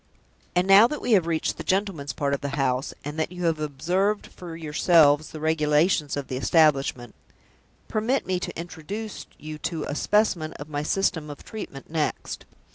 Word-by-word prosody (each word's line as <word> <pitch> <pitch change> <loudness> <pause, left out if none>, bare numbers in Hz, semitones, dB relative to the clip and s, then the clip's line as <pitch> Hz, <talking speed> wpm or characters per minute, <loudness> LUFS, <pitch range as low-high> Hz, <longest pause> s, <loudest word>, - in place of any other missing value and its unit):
And 180 +1 +3
now 200 +4 +8
that 300 +3 -4
we - - -2
have 185 -6 +4
reached 165 -2 -1
the - - -6
gentleman's 190 -7 -1
part 140 -1 -1
of 140 - -1
the 140 +1 -3
house, 135 0 0
and 150 +2 -5
that 160 - -1
you 180 -1 -4
have 165 -2 +1
observed 180 +8 0
for 175 -2 -9
yourselves 155 -1 +4
the 155 - -8
regulations 155 0 +2
of 140 - -4
the 130 - -3
establishment, 135 -5 +2 0.7
permit 225 +5 0
me 185 -1 0
to 180 - -5
introduce 190 +6 -6
you 155 0 -8
to 160 -2 -3
a - - -4
specimen 175 -2 +1
of 145 +1 -9
my 145 -1 -2
system 160 -1 0
of 145 - -9
treatment 155 -11 -8
next. 155 -2 -2
160 Hz, 180 wpm, -25 LUFS, 145-185 Hz, 0.7 s, now